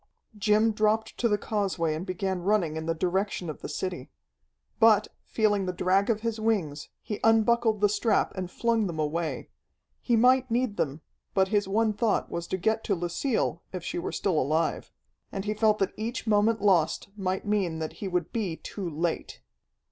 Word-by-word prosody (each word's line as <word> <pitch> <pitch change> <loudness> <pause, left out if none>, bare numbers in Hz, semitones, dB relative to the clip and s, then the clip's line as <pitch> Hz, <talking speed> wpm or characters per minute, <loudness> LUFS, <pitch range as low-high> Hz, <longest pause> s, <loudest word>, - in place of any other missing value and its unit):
Jim 210 +2 +3
dropped 215 +1 +1
to 240 - +1
the 210 - +2
causeway 195 -7 -1
and 160 +5 -5
began 185 0 -2
running 180 -5 +1
in 160 0 -4
the 165 - 0
direction 180 0 -1
of - - -12
the - - -6
city. 175 -2 -4 0.7
But, 215 -2 +5 0.2
feeling 205 -3 +1
the - - 0
drag 185 +3 +1
of 220 -2 +1
his 230 -1 -2
wings, 185 -10 -1
he 210 - -4
unbuckled 225 -1 +3
the 205 - +6
strap 215 +2 +1
and 185 -2 -4
flung 230 +1 +1
them 170 -3 -5
away. 155 +2 -2 0.5
He 240 - +2
might 255 +2 +4
need 235 -2 0
them, 145 +1 -2 0.3
but 190 -1 +3
his 205 -1 +1
one 215 +2 +2
thought 210 +1 0
was 170 0 -4
to 185 - -2
get 220 +4 0
to 200 - +1
Lucille, 175 +3 -1
if 185 -3 -5
she 175 - -3
were - - -3
still 180 -6 0
alive. 155 +4 -1 0.4
And 195 0 -4
he 210 - 0
felt 215 0 +3
that 195 -2 0
each 230 +4 -4
moment 215 0 +2
lost 185 -3 +2
might 190 -1 -2
mean 200 -6 0
that 160 -1 -4
he 200 - -2
would 180 -3 -2
be 200 -8 -1
too 185 +2 -6
late. 165 +2 -3
200 Hz, 185 wpm, -27 LUFS, 175-220 Hz, 0.7 s, the